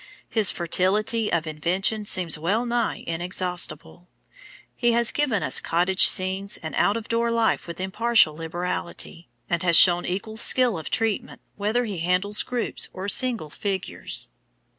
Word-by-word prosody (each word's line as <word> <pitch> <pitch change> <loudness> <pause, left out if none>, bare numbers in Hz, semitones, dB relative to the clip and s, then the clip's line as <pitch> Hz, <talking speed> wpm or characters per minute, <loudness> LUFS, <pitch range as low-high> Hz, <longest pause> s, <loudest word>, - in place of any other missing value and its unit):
His 215 -4 +3
fertility 205 +6 +1
of 170 -1 0
invention 185 +7 -1
seems 175 -5 +3
well 195 +10 -1
nigh 235 -1 -2
inexhaustible. 180 +1 -4 0.7
He 240 -1 +1
has 235 0 +2
given 260 -10 -1
us - - +2
cottage 180 +3 +4
scenes 190 +2 +1
and 160 - -8
out 205 +2 +1
of 230 - -8
door 235 0 0
life 230 -4 0
with 170 +1 -8
impartial 210 -2 +2
liberality, 170 +1 -6 0.2
and 170 -1 -1
has 170 -2 +3
shown 175 -1 +6
equal 200 +4 -4
skill 245 -1 +4
of 160 - -7
treatment, 225 -3 -2 0.2
whether 215 +5 -1
he 200 -6 -5
handles 180 +5 0
groups 245 -2 -3
or 190 +2 -6
single 230 - +1
figures. 190 - -4
190 Hz, 145 wpm, -23 LUFS, 175-225 Hz, 0.7 s, shown